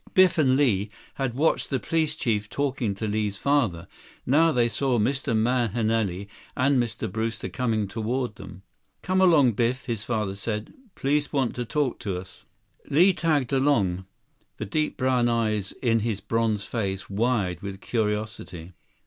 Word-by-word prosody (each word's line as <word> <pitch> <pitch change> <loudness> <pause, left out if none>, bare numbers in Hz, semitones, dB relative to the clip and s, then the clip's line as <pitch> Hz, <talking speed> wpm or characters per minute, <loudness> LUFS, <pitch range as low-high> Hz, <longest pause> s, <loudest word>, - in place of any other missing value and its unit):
Biff 185 -3 +5
and 130 -4 +4
Li 110 -8 +2 0.2
had 135 -3 -2
watched 155 +5 +1
the 135 - 0
police 160 0 0
chief 105 -8 -1
talking 130 -7 -1
to 110 - -4
Li's 105 -1 -1
father. 115 - +1 0.4
Now 160 +5 +4
they 120 -5 +3
saw 125 +2 0
Mr. 125 +1 0
Mahenili 110 -4 0 0.3
and 130 0 +3
Mr. 115 -2 -3
Brewster 115 0 -3
coming 110 -5 -1
toward 115 +3 -2
them. 95 -1 -11 0.4
"Come 185 +1 +1
along, 155 -9 +6
Biff," 120 +4 -1
his 115 -5 -3
father 110 -4 -1
said. 105 +2 -4 0.2
"Police 145 +2 0
want 135 -5 0
to 125 - -3
talk 135 +2 -1
to 95 -4 -3
us." 95 +1 -11 0.4
Li 180 +7 +5
tagged 150 -7 0
along, 100 -10 +1 0.5
the - - -4
deep 155 +9 -1
brown 130 -2 +2
eyes 110 -4 0
in 115 -2 +3
his 110 -2 -2
bronze 115 -2 0
face 95 -5 -3
wide 100 -4 0
with 100 -1 -6
curiosity. 105 -6 -3
115 Hz, 155 wpm, -25 LUFS, 105-135 Hz, 0.5 s, along